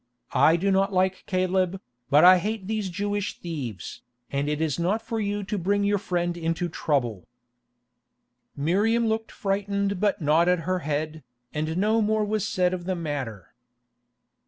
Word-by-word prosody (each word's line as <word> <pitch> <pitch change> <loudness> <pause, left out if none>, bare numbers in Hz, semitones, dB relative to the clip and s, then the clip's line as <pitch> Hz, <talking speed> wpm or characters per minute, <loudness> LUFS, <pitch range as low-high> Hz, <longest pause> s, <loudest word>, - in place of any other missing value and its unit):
I 160 - +5
do 195 +3 +1
not 195 +1 +2
like 185 0 0
Caleb, 185 0 0 0.3
but 150 +3 +6
I 185 0 +9
hate 210 +1 -3
these 215 -1 -2
Jewish 205 +3 -2
thieves, 135 - -6 0.3
and 140 +1 -1
it 150 0 -1
is 160 -1 -1
not 185 +6 +1
for 225 0 -4
you 205 -1 -2
to 210 +1 -3
bring 200 +3 +1
your 205 0 +2
friend 175 -2 -1
into 165 +1 -2
trouble." 120 - -1 1.3
Miriam 205 +11 +2
looked 220 0 -1
frightened 200 -1 -1
but 205 0 +1
nodded 165 +3 +3
her 185 +2 -1
head, 155 +1 -3 0.3
and 155 +2 -2
no 215 +4 +2
more 215 0 +1
was 210 -1 -1
said 180 -4 +1
of 175 -1 -4
the 185 0 -1
matter. 140 - -5
185 Hz, 160 wpm, -26 LUFS, 160-205 Hz, 1.3 s, I